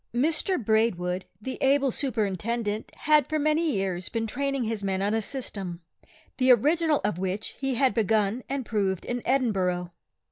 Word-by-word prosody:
Mr 320 +8 +1
Braidwood, 195 -5 +1
the 260 +4 -6
able 275 0 +3
Superintendent, 220 -3 -2
had 300 -3 +4
for 310 - 0
many 310 +2 +2
years 190 -4 -2
been 225 -1 -2
training 275 +3 -1
his 220 -2 -2
men 190 -1 0
on 200 +2 0
a 225 - +1
system, 195 -8 -3 0.5
the 255 -1 +5
original 300 +5 +3
of 200 -4 -1
which 190 +3 -2
he 270 -2 -1
had 260 -2 +3
begun 215 +2 +1
and 270 -2 -2
proved 195 -5 -1
in 245 0 -3
Edinburgh. 190 -9 +1
225 Hz, 155 wpm, -27 LUFS, 195-270 Hz, 0.5 s, the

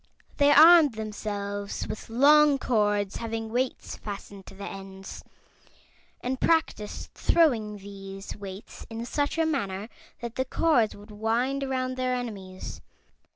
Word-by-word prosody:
They 285 -1 +5
armed 310 -3 +8
themselves 205 -2 -4
with 215 +1 -7
long 290 +4 +6
cords 205 -6 +1
having 225 -1 -4
weights 255 +2 -2
fastened 200 -1 -8
to - - -11
the 200 +1 -7
ends, 195 0 -9 1.0
and 255 +1 -3
practiced 320 -11 0
throwing 230 -11 +2
these 195 0 -9
weights 195 0 -9
in 225 +1 -5
such 285 +5 -1
a 325 - +3
manner 210 -9 -2 0.3
that 235 -1 -6
the 260 - +1
cords 255 -6 +2
would 205 +2 -14
wind 235 +6 0
around 255 -1 -2
their 255 0 0
enemies. 195 -6 -6
225 Hz, 130 wpm, -27 LUFS, 200-265 Hz, 1.0 s, armed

